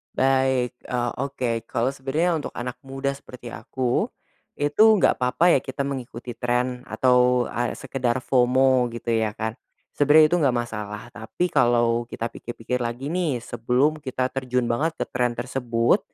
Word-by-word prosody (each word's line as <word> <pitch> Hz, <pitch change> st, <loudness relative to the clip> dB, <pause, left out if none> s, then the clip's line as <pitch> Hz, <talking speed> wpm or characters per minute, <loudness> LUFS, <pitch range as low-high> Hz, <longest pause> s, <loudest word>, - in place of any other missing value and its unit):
Baik. 130 Hz, -2 st, +2 dB, 0.2 s
Oh, 120 Hz, -1 st, -1 dB, 0.2 s
oke. 115 Hz, -5 st, -3 dB
Kalau 125 Hz, +1 st, 0 dB
sebenarnya 150 Hz, +5 st, 0 dB
untuk -, -, -6 dB
anak 125 Hz, +1 st, -5 dB
muda 135 Hz, +1 st, -2 dB
seperti 125 Hz, -3 st, -10 dB
aku, 125 Hz, +2 st, -1 dB, 0.5 s
itu 145 Hz, +8 st, +3 dB
enggak 200 Hz, -, +3 dB
papa 130 Hz, +8 st, +3 dB
ya, 135 Hz, -, +5 dB
kita 135 Hz, +2 st, -4 dB
mengikuti 125 Hz, -3 st, -5 dB
tren, 125 Hz, +1 st, -2 dB
atau 125 Hz, -1 st, +3 dB
a 120 Hz, 0 st, -2 dB
sekedar 130 Hz, -2 st, -2 dB
FOMO, 130 Hz, 0 st, +3 dB
gitu 115 Hz, 0 st, -3 dB
ya 110 Hz, -2 st, 0 dB
kan. 110 Hz, +2 st, -4 dB, 0.3 s
Sebenarnya 150 Hz, +2 st, +6 dB
itu 175 Hz, -, +4 dB
enggak 135 Hz, -5 st, +2 dB
masalah, 105 Hz, -3 st, -4 dB
tapi 110 Hz, +12 st, -3 dB
kalau 120 Hz, 0 st, +2 dB
kita 115 Hz, -1 st, -4 dB
pikir-pikir 120 Hz, +1 st, -4 dB
lagi 120 Hz, +5 st, -3 dB
nih, 155 Hz, -10 st, -1 dB
sebelum 125 Hz, +7 st, +1 dB
kita 130 Hz, -2 st, -2 dB
terjun 125 Hz, -1 st, -1 dB
banget 160 Hz, +7 st, 0 dB
ke -, -, -2 dB
trend 120 Hz, -1 st, 0 dB
tersebut, 120 Hz, -2 st, +1 dB
125 Hz, 150 wpm, -24 LUFS, 120-135 Hz, 0.5 s, Sebenarnya